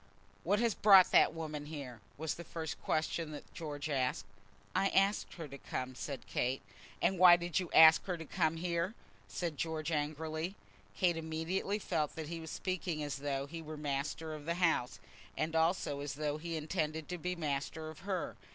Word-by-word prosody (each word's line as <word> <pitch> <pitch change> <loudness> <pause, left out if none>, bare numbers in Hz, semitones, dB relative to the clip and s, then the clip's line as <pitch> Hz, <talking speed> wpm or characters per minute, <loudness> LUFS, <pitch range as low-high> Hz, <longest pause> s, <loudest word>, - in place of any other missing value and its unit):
"What 200 +5 +2
has 235 -2 +2
brought 195 -3 +7
that - - +6
woman 155 -2 -5
here?" 135 -7 -7 0.2
was 160 +1 -2
the 170 - -8
first 160 -2 -5
question 160 +1 -1
that 145 - -10
George 150 -2 -5
asked. 130 -8 0 0.5
"I 195 - +3
asked 195 +2 +2
her 165 -3 -6
to 140 0 -10
come," 130 0 -4
said 135 +1 -6
Kate. 125 -2 -1 0.4
"And 185 +1 +2
why 180 -1 +10
did 175 -1 -1
you 180 -3 -4
ask 160 0 +8
her 180 -2 -2
to 165 - -7
come 160 -1 +1
here?" 170 +4 -1 0.3
said 150 - -3
George, 160 0 -2
angrily. 155 +4 -2 0.4
Kate 175 -3 +3
immediately 165 +5 -2
felt 160 -7 -1
that 160 -2 -5
he 165 -1 -4
was 160 -1 -7
speaking 180 -3 -2
as 145 -2 -3
though 140 -1 -2
he 165 +3 -7
were 155 -1 -7
master 150 +2 -3
of 150 -1 -8
the 170 +1 0
house, 165 -8 +1 0.4
and 160 +1 -1
also 160 -3 +1
as 145 0 -4
though 150 0 -2
he 165 0 -3
intended 155 -1 -2
to 180 -1 -4
be 180 +2 -2
master 155 0 -3
of 155 - -13
her. 185 - -3
160 Hz, 190 wpm, -34 LUFS, 150-175 Hz, 0.5 s, why